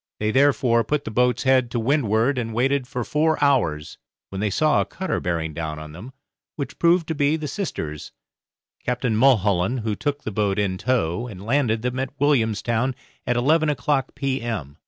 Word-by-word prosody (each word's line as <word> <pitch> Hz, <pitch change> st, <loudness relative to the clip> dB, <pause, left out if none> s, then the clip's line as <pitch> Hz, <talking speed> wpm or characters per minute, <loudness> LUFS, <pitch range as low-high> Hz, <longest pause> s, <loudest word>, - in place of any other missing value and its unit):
They 105 Hz, 0 st, 0 dB
therefore 130 Hz, -3 st, +3 dB
put 150 Hz, +2 st, -1 dB
the -, -, -4 dB
boat's 125 Hz, +2 st, +1 dB
head 130 Hz, -2 st, +3 dB
to 120 Hz, -, -2 dB
windward 125 Hz, 0 st, +1 dB
and 115 Hz, -2 st, -4 dB
waited 135 Hz, +2 st, +1 dB
for 125 Hz, -1 st, -3 dB
four 155 Hz, +5 st, +1 dB
hours, 80 Hz, -, +1 dB, 0.3 s
when 95 Hz, 0 st, -5 dB
they 105 Hz, -, +1 dB
saw 155 Hz, +10 st, +2 dB
a -, -, -1 dB
cutter 190 Hz, +1 st, -3 dB
bearing 80 Hz, -2 st, -2 dB
down 80 Hz, 0 st, -4 dB
on 75 Hz, 0 st, -9 dB
them, 95 Hz, +11 st, -10 dB, 0.4 s
which 140 Hz, -, -6 dB
proved 170 Hz, 0 st, +3 dB
to -, -, 0 dB
be 145 Hz, +1 st, +1 dB
'The 155 Hz, -1 st, -5 dB
Sisters', 80 Hz, -, -5 dB, 0.7 s
Captain 125 Hz, -2 st, -1 dB
Mulholland, 110 Hz, -2 st, +3 dB
who 110 Hz, -1 st, -2 dB
took 145 Hz, +3 st, -3 dB
the 110 Hz, -, -4 dB
boat 100 Hz, -1 st, 0 dB
in 95 Hz, -3 st, -1 dB
tow 115 Hz, -1 st, 0 dB
and 100 Hz, -4 st, -9 dB
landed 115 Hz, -3 st, +1 dB
them 125 Hz, +1 st, -2 dB
at 135 Hz, +1 st, -5 dB
Williamstown 120 Hz, -2 st, +1 dB, 0.3 s
at 120 Hz, -, +1 dB
eleven 155 Hz, +5 st, +3 dB
o'clock 140 Hz, -2 st, -1 dB
p.m. 120 Hz, -, -3 dB
125 Hz, 180 wpm, -23 LUFS, 105-140 Hz, 0.7 s, therefore